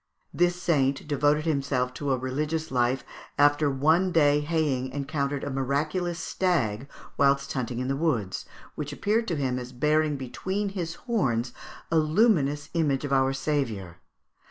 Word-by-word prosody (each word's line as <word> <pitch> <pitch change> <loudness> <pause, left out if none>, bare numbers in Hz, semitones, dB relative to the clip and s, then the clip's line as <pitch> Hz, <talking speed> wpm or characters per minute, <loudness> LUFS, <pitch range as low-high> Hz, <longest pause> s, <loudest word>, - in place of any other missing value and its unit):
This 175 0 +2
saint 140 -6 +1
devoted 150 +1 +2
himself 140 -5 0
to 140 +1 -2
a 130 - +2
religious 150 +5 -2
life, 125 +1 +1 0.3
after 145 +1 +4
one 160 +7 +2
day 145 -3 +4
haying 145 -4 0
encountered 140 0 -2
a - - -3
miraculous 150 +6 -1
stag 140 - -1 0.3
whilst 140 0 +2
hunting 125 -2 -3
in 130 +1 -2
the 135 - 0
woods, 135 - -1 0.3
which 150 -1 -5
appeared 215 +9 0
to 170 - -1
him 130 -3 -1
as 125 0 -7
bearing 150 +3 +1
between 190 +10 -3
his 175 -4 -4
horns 130 - 0 0.4
a 165 - +3
luminous 155 -4 +2
image 150 -5 +1
of 140 - -2
our 135 0 +3
Saviour. 120 - -2
145 Hz, 150 wpm, -27 LUFS, 130-160 Hz, 0.4 s, after